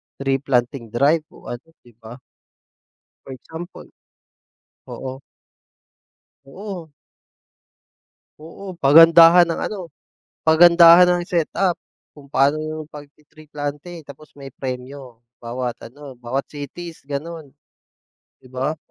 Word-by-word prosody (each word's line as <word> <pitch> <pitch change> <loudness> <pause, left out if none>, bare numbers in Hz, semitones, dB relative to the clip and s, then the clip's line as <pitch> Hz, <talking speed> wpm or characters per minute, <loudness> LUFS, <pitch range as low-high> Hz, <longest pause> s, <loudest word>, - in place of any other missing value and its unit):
tree 135 0 -1
planting 125 -2 -1
drive 145 +7 +1
o - - -11
ano, 120 +5 -9 0.2
'di 120 - -19
ba? 115 +1 -11 1.1
For 135 - -10
example 160 +7 -10 1.0
oo. 130 0 -8 1.3
Oo. 175 +1 -9 1.5
Oo, 185 +4 -10
pagandahan 165 +4 +7
ng 165 -1 -4
ano, 180 -7 -6 0.5
pagandahan 170 +2 +7
ng 175 0 +1
setup 175 0 -1 0.3
kung 145 -2 -17
paano 140 +2 +1
'yong 155 0 -7
pagti-tree 150 +1 -15
planting, 150 +3 -7
tapos 150 +1 -15
may 140 -1 -11
premyo, 130 -1 -8 0.2
bawat 120 +1 -5
ano, 135 +1 -13
bawat 125 +3 -4
cities, 160 +4 -9
gano'n. 150 0 -7 0.9
'Di 130 - -17
ba? 135 +5 -3
145 Hz, 105 wpm, -20 LUFS, 135-165 Hz, 1.5 s, pagandahan